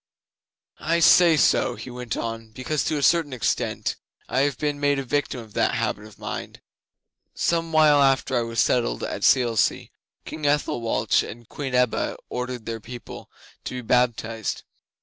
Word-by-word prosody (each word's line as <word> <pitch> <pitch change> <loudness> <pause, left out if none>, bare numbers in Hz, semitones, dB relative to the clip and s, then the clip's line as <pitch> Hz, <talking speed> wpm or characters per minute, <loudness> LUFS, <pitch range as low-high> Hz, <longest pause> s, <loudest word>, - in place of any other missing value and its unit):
'I 170 +2 +1
say 170 -1 +6
so,' - - +3
he 130 - -9
went 125 -3 -5
on, 115 -1 -5
'because 135 +5 -2
to 155 - 0
a 145 - -2
certain 165 -4 +3
extent 125 - -1 0.3
I 130 - 0
have 140 -2 +1
been 145 -1 -2
made 145 0 +2
a 135 - -2
victim 135 0 -1
of 110 -2 -14
that - - +1
habit 105 - -2
of 110 - -15
mind. - - -6 0.8
Some 165 -1 0
while 155 -2 +5
after 135 -1 +2
I 120 - +2
was 115 -1 -3
settled 115 - +1
at - - -4
Selsey, 120 -5 +2 0.3
King 155 -2 -4
Ethelwalch 145 -5 +1
and 120 0 -9
Queen 135 -3 -4
Ebba 125 -2 +1
ordered 125 -2 -4
their 115 -1 -4
people 120 +2 -10 0.4
to - - -5
be 125 - -4
baptized. 115 -2 0
125 Hz, 165 wpm, -24 LUFS, 115-145 Hz, 0.8 s, say